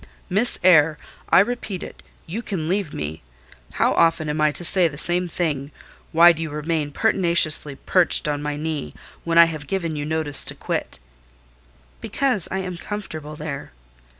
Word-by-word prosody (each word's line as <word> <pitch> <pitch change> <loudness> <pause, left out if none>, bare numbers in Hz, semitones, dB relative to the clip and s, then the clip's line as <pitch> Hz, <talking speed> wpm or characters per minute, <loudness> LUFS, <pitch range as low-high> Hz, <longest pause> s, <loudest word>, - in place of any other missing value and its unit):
"Miss 215 +6 +3
Eyre, 160 -4 +5 0.3
I - - +5
repeat 210 -4 -4
it, - - -11 0.2
you 200 +8 -5
can 185 -9 -4
leave 185 -3 -1
me. 75 +1 -6 0.5
How - - +1
often 165 -2 +2
am 150 +1 -2
I 155 - +4
to 175 - -3
say 180 0 +3
the 140 -3 -8
same 175 +3 0
thing? 150 -5 -3 0.4
Why 170 +2 +7
do 165 -1 -5
you 160 - -3
remain 150 0 -3
pertinaciously 170 -6 +2
perched 175 +1 +2
on 145 -1 -2
my 150 0 -3
knee, 155 -1 -5 0.3
when 165 0 -1
I 170 - +9
have 155 -3 -6
given 170 -4 -3
you 145 - -4
notice 155 -1 +4
to - - -2
quit?" - - -4 1.0
"Because 255 - -1
I 190 - -3
am 185 -2 -6
comfortable 160 -7 -7
there." 145 - -7
160 Hz, 170 wpm, -22 LUFS, 150-180 Hz, 1.0 s, I